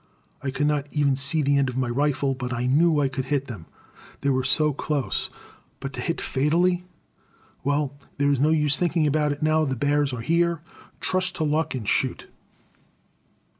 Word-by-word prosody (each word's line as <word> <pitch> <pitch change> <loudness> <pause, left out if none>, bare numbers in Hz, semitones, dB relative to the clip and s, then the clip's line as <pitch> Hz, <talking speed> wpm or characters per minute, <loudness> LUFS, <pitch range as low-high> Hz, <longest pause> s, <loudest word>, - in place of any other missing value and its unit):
I 135 - -3
could 135 +2 -1
not 145 -1 0
even 145 -2 +1
see 140 +3 +2
the 140 0 +3
end 135 -2 +1
of 125 - -5
my 130 -1 0
rifle; 140 +2 0
but 125 -1 -5
I 120 0 -2
knew 155 +4 +3
I 140 - +2
could 130 0 -4
hit 140 -1 0
them, 105 -11 -9 0.5
they 140 - +1
were 130 0 +1
so 150 +3 +3
close. 145 -1 -2 0.5
But 135 0 -6
to - - -5
hit 165 - -2
fatally? 175 +6 +1 0.8
Well, 145 0 0 0.2
there 145 0 +2
is 140 - +1
no 150 +3 +3
use 150 -3 +3
thinking 165 0 +1
about 150 0 +2
it 145 +1 -4
now 155 0 +3
the 135 -3 -1
bears 145 +2 +1
are 125 -2 -4
here. 170 +4 +1 0.4
Trust 185 -1 0
to 160 - -1
luck 155 0 0
and 115 -5 -5
shoot! - - 0
145 Hz, 190 wpm, -24 LUFS, 135-155 Hz, 0.8 s, the